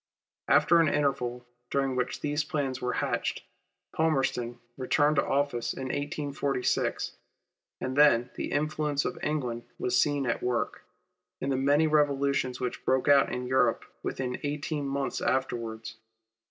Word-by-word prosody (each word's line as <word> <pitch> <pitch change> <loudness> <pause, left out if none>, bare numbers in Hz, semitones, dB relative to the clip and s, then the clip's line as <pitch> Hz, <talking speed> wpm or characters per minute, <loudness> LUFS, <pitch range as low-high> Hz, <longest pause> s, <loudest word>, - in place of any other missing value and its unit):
After 170 - +5
an 165 - +4
interval 125 -4 0 0.2
during 135 -2 0
which 125 -1 -2
these 150 +1 0
plans 140 -5 -2
were 125 0 -1
hatched, - - -2 0.5
Palmerston 135 -6 0 0.2
returned 145 +3 +2
to - - +4
office 135 -4 0
in 130 -1 -5
1846, 145 -2 -1 0.6
and 130 0 -3
then 125 -4 +5
the - - -4
influence 150 -1 0
of - - -3
England 125 -6 -2
was 125 - 0
seen 145 -2 +1
at 115 - -1
work, 125 -1 -1 0.6
in 135 - -2
the - - +2
many 145 +4 +3
revolutions 140 -4 +1
which 125 -1 -4
broke 130 +1 +1
out 140 -1 +5
in 125 0 -3
Europe 130 +1 +2 0.2
within 125 -1 -3
eighteen 145 0 -2
months 135 0 -2
afterwards. 115 -4 -2
135 Hz, 140 wpm, -28 LUFS, 125-145 Hz, 0.6 s, After